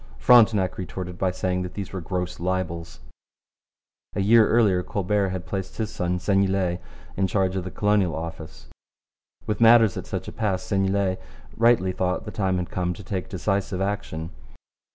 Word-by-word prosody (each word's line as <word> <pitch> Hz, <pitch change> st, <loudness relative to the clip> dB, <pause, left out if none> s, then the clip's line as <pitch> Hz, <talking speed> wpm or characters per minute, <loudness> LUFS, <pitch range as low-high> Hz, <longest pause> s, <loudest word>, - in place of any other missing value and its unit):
Frontenac 105 Hz, -, +4 dB
retorted 90 Hz, -1 st, -6 dB
by 95 Hz, -, +2 dB
saying 90 Hz, 0 st, -1 dB
that 90 Hz, -1 st, -6 dB
these 100 Hz, -2 st, -6 dB
were 95 Hz, -, -4 dB
gross 90 Hz, +2 st, -4 dB
libels. 85 Hz, -3 st, -3 dB, 1.1 s
A -, -, -1 dB
year 110 Hz, +2 st, +5 dB
earlier 105 Hz, -6 st, +3 dB
Colbert 100 Hz, +1 st, 0 dB
had 90 Hz, -1 st, -5 dB
placed 95 Hz, -1 st, -5 dB
his 110 Hz, -1 st, -2 dB
son, 90 Hz, 0 st, -1 dB
Seignelay, 95 Hz, -2 st, +1 dB, 0.4 s
in 95 Hz, 0 st, +1 dB
charge 95 Hz, 0 st, 0 dB
of 95 Hz, -, -2 dB
the -, -, -4 dB
Colonial 105 Hz, -4 st, +1 dB
Office. 80 Hz, -3 st, -7 dB, 0.8 s
With 105 Hz, +1 st, -2 dB
matters 115 Hz, -3 st, +6 dB
at -, -, -6 dB
such -, -, -4 dB
a -, -, -5 dB
pass 100 Hz, -5 st, -1 dB
Seignelay 95 Hz, -1 st, 0 dB, 0.4 s
rightly 115 Hz, -5 st, +3 dB
thought 90 Hz, +1 st, -2 dB
the 105 Hz, -, -6 dB
time 95 Hz, -3 st, 0 dB
had 90 Hz, -1 st, -4 dB
come 90 Hz, -1 st, -1 dB
to 100 Hz, -, -10 dB
take 95 Hz, +2 st, -4 dB
decisive 100 Hz, -1 st, -1 dB
action. 95 Hz, -5 st, -3 dB
95 Hz, 165 wpm, -24 LUFS, 90-100 Hz, 1.1 s, matters